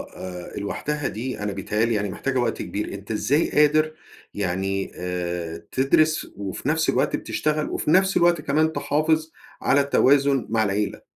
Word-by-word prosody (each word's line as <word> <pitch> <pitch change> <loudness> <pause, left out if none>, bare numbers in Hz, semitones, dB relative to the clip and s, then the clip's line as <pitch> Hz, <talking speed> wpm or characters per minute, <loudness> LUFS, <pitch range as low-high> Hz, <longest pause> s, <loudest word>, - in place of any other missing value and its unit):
آآ 90 -1 -7
لوحدها 145 +8 -3
دي 125 +4 -4
أنا 105 0 -2
بيتهيأ 105 +3 0
لي 115 - 0
يعني 105 -1 -1
محتاجة 130 +7 -2
وقت 120 - -1
كبير، 105 - -4
أنت 100 +2 -8
إزاي 140 +8 +1
قادر 155 +1 +3 0.4
يعني 95 0 -2
آآ 90 -2 -3
تدرس 155 +4 +2
وفي 100 +6 -4
نفس 160 +1 +1
الوقت - - +1
بتشتغل 155 0 -1
وفي - - -1
نفس 190 +3 +4
الوقت 170 -2 +3
كمان 155 +3 +1
تحافظ 155 +2 0 0.3
على 140 +1 +4
التوازن 140 -1 +3
مع 110 0 +2
العيلة؟ 105 0 -1
130 Hz, 155 wpm, -24 LUFS, 100-150 Hz, 0.4 s, نفس